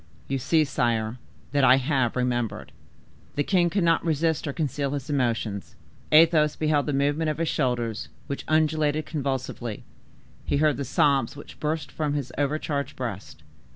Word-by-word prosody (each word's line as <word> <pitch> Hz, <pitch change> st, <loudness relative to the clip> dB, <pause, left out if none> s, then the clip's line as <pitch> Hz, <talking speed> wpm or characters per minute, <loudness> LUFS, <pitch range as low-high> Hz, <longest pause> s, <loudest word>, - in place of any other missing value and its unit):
You 135 Hz, 0 st, -1 dB
see, 155 Hz, +4 st, +3 dB
sire, 120 Hz, -3 st, -1 dB, 0.3 s
that 140 Hz, -1 st, +2 dB
I 130 Hz, 0 st, +8 dB
have 130 Hz, -3 st, 0 dB
remembered." 120 Hz, -3 st, -1 dB, 0.6 s
The 145 Hz, -, +1 dB
king 175 Hz, -1 st, +2 dB
could 195 Hz, +1 st, 0 dB
not 165 Hz, -1 st, +3 dB
resist 160 Hz, -1 st, 0 dB
or -, -, -1 dB
conceal 140 Hz, -1 st, -2 dB
his 145 Hz, +1 st, -4 dB
emotion. 115 Hz, -7 st, 0 dB, 0.5 s
Athos 155 Hz, -1 st, +5 dB
beheld 150 Hz, -2 st, +1 dB
the -, -, +1 dB
movement 145 Hz, +3 st, +1 dB
of 155 Hz, -, -2 dB
his 165 Hz, 0 st, 0 dB
shoulders, 120 Hz, -5 st, -1 dB, 0.2 s
which 140 Hz, -, -5 dB
undulated 155 Hz, -1 st, +2 dB
convulsively; 130 Hz, -6 st, -3 dB, 0.6 s
he -, -, 0 dB
heard 150 Hz, 0 st, +3 dB
the 140 Hz, -, -3 dB
sobs 135 Hz, -1 st, +2 dB
which 145 Hz, -, -12 dB
burst 155 Hz, 0 st, -2 dB
from 150 Hz, -2 st, -1 dB
his 135 Hz, -4 st, -3 dB
over 145 Hz, +1 st, 0 dB
charged 140 Hz, -2 st, -3 dB
breast. 115 Hz, -6 st, -6 dB
145 Hz, 160 wpm, -26 LUFS, 125-155 Hz, 0.6 s, I